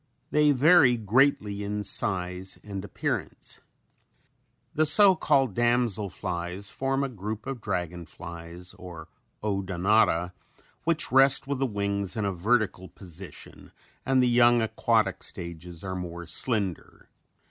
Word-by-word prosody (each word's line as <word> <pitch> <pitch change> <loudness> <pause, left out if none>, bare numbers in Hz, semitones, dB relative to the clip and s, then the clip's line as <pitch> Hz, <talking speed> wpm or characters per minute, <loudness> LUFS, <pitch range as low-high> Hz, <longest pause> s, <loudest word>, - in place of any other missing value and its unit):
They 150 0 +4
vary 145 -2 +5
greatly 105 -2 +2
in 105 +1 -3
size 90 -2 -1
and 100 -2 -6
appearance. - - -4 1.1
The 155 +1 +2
so 190 +5 +6
called 135 - +2
damsel 120 -3 +1
flies 90 +3 -5
form 135 +1 -1
a - - 0
group 110 -2 -6
of 135 -4 -5
dragon 90 -4 -3
flies 85 +1 -9
or 85 -3 -10 0.3
Odonata 95 -2 +1 0.5
which 165 -1 +1
rest 135 +1 +5
with 140 -1 -3
the 135 - +1
wings 100 -2 -2
in 105 - -1
a 100 - -1
vertical 100 0 0
position 90 -1 -11 0.3
and 130 -1 +3
the - - +3
young 120 0 +5
aquatic 110 - +1
stages 85 0 -7
are 95 -1 -4
more 85 -1 -6
slender. 100 - -3
100 Hz, 125 wpm, -27 LUFS, 90-125 Hz, 1.1 s, so